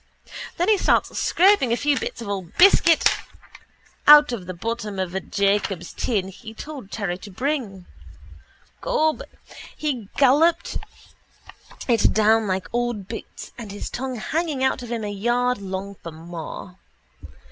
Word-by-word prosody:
Then 350 - +1
he 425 -2 +4
starts - - +2
scraping 365 - +4
a 235 - +2
few 290 +1 +2
bits 235 - -4
of - - -8
old 190 -4 -5
biscuit 345 -3 +6 1.0
out 295 -1 +9
of 200 -7 -5
the 185 - -4
bottom 215 +1 -4
of 185 -2 -3
a 190 - -1
Jacobs' 195 -3 -1
tin 200 -6 -1
he 210 +4 -11
told 275 -6 -8
Terry 195 -5 -3
to 205 - -10
bring. 220 -5 -3 1.0
Gob, 315 -11 +1 0.6
he 255 -10 -3
golloped 290 +5 +3 1.1
it 230 -4 +3
down 220 0 +3
like 190 -1 -2
old 240 -5 -2
boots 225 - -8
and 215 -4 -7
his 205 - -6
tongue 260 0 -4
hanging 300 +3 -2
out 265 -1 +1
of 240 -1 -8
him 230 -2 -3
a - - -3
yard 240 +4 0
long 195 0 -5
for 170 -3 -10
more. 170 +3 -9
225 Hz, 145 wpm, -23 LUFS, 195-270 Hz, 1.1 s, out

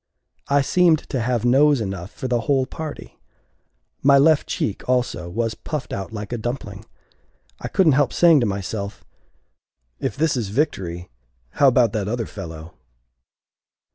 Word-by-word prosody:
I 140 0 +3
seemed 170 +3 +4
to 130 - -1
have 120 0 -1
nose 140 +3 +4
enough 95 -4 -4
for 130 - -6
the 120 -1 +1
whole 135 +2 +1
party. 155 +3 -8 0.8
My 140 0 +6
left 150 +2 +4
cheek, 105 +3 -3
also, 125 -8 0
was 115 +4 -2
puffed 150 +4 -6
out 95 +1 -5
like 105 +1 -6
a 120 - -3
dumpling. 110 -4 -5 0.7
I - - -5
couldn't 180 -5 +3
help 140 -2 +2
saying 170 -4 +5
to 120 - +1
myself, 100 +1 -4 1.0
"If - - -3
this 155 -1 +1
is 115 -6 -2
victory, 95 - -2 0.4
how 140 - +3
about 120 -4 +4
that 105 -3 -2
other 115 +1 -2
fellow?" 80 -5 -9
120 Hz, 150 wpm, -22 LUFS, 100-140 Hz, 1.0 s, My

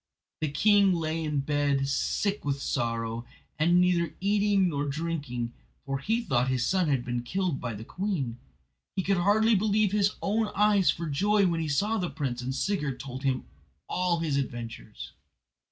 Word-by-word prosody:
The 155 - -1
king 200 +6 +4
lay 165 -1 -1
in 150 -2 0
bed 140 -1 +1
sick 200 +8 0
with 140 -1 -1
sorrow, 115 -3 -2 0.4
and 175 +3 +4
neither 180 -2 +2
eating 200 -1 +3
nor 145 -3 -1
drinking, 140 -6 -3 0.3
for 135 0 -2
he 225 - 0
thought 125 - +1
that 130 - -1
his 125 -2 +1
son 185 +3 +2
had 135 -4 +1
been 120 -1 -2
killed 180 +3 -2
by 120 -3 -3
the 105 - -7
queen. 145 - -3 0.6
He 190 - 0
could 195 0 +2
hardly 215 +5 +4
believe 210 0 +2
his 205 0 +2
own 215 +2 0
eyes 205 -2 +4
for 170 - 0
joy 200 +7 +2
when 170 -2 +1
he 160 - -2
saw 210 +10 +1
the 180 -2 -1
prince, 125 -4 -3
and 130 +2 -3
Sigurd 150 -8 -1
told 130 0 -7
him 135 -2 0 0.4
all 180 -1 0
his 150 -4 0
adventures. 115 -4 -5
155 Hz, 175 wpm, -28 LUFS, 135-195 Hz, 0.6 s, king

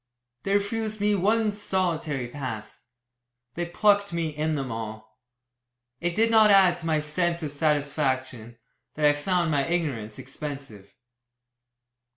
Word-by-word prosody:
They 195 0 0
refused 215 +1 -1
me 205 +1 +2
one 210 +3 +2
solitary 170 -9 -2
"pass." 120 -5 -7 0.7
They 170 +3 -3
"plucked" 205 +3 +2
me 170 -2 -1
in 155 +1 -1
them 135 -3 -3
all. 110 0 -7 0.8
It 175 0 -2
did 225 +1 +3
not 220 -1 +6
add 190 -3 +6
to 165 - -5
my 155 -1 +2
sense 170 +2 -1
of 145 -2 -4
satisfaction, 135 -6 -1 0.4
that 150 - 0
I 145 - +6
found 170 +2 0
my 140 -2 +2
ignorance 140 -12 -2
expensive. 135 -7 -8
155 Hz, 135 wpm, -26 LUFS, 135-190 Hz, 0.8 s, not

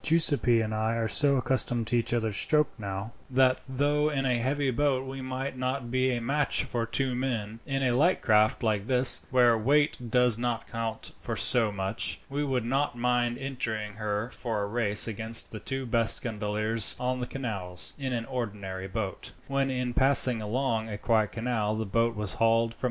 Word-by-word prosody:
Giuseppi 145 -7 +3
and 110 0 -3
I 110 +1 -1
are 115 -1 -1
so 140 +4 +3
accustomed 120 -2 0
to 115 - -1
each 120 - +1
other's 110 -3 0
stroke 150 +6 +3
now, 100 +1 -5 0.2
that 130 0 +3
though 145 +3 +1
in 135 -3 -2
a 125 -2 +1
heavy 135 +2 0
boat 135 0 0
we 135 0 -7
might 130 +1 -4
not 130 -1 -3
be 130 +1 +1
a 125 -2 -1
match 140 +4 0
for 115 -1 -3
two 130 +2 0
men, 115 -4 -3
in 135 -1 -1
a 125 - +2
light 170 +8 +3
craft 110 0 +2
like 105 -2 0
this, 125 -1 +3
where 125 -2 +4
weight 135 +1 +1
does 125 -1 +3
not 120 -1 -2
count 115 -1 -5
for - - -4
so 115 -4 +1
much, 95 +2 -3
we 145 +1 -1
would 130 -5 -1
not 135 +1 -1
mind 120 0 0
entering 115 -6 -4
her 105 +2 -3
for 110 -4 -3
a - - -3
race 105 -1 +4
against 115 +1 -1
the 110 - -7
two 135 +4 -3
best 115 -2 +2
gondoliers 110 0 0
on 125 0 -1
the 125 - -4
canals, 100 -10 -3
in 135 -2 -3
an 115 -2 -2
ordinary 100 -7 -5
boat." 100 0 -5
120 Hz, 160 wpm, -28 LUFS, 110-130 Hz, 0.2 s, where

